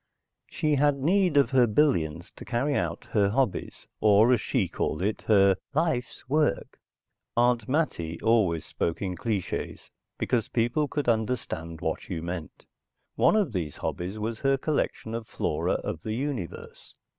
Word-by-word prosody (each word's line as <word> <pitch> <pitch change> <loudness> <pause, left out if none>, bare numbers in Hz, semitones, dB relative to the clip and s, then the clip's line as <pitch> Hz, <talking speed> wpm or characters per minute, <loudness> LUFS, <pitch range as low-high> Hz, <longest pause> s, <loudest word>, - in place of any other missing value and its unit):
She 150 -2 0
had 145 0 +3
need 175 +2 +2
of 140 -3 +4
her 125 -2 +5
billions 85 - +1
to - - -10
carry 130 +4 0
out 85 -8 -2
her 100 -2 +3
hobbies, 125 -1 -1
or, 110 +3 +5
as 120 - +2
she 110 -8 0
called 85 0 -2
it, 105 +2 -1
her 100 -3 +5 0.2
"life's 135 -6 -1
work." 150 -6 0 0.6
Aunt 120 -1 +2
Mattie 85 - -1
always 105 -8 +2
spoke 85 +3 -2
in 90 -2 -2
clichés 105 -3 -3 0.3
because 115 -4 0
people 120 +6 +1
could 145 -2 -3
understand 110 -8 -1
what 80 - -3
you 85 -4 -4
meant. 85 -3 -6 0.5
One - - +3
of 195 - +1
these 80 -7 -3
hobbies 90 +4 -4
was 110 +1 -3
her 135 0 +2
collection 135 -6 -2
of 115 -1 -4
flora - - -1
of 80 - -3
the 110 - -3
universe. 130 - -5
115 Hz, 155 wpm, -27 LUFS, 90-135 Hz, 0.6 s, her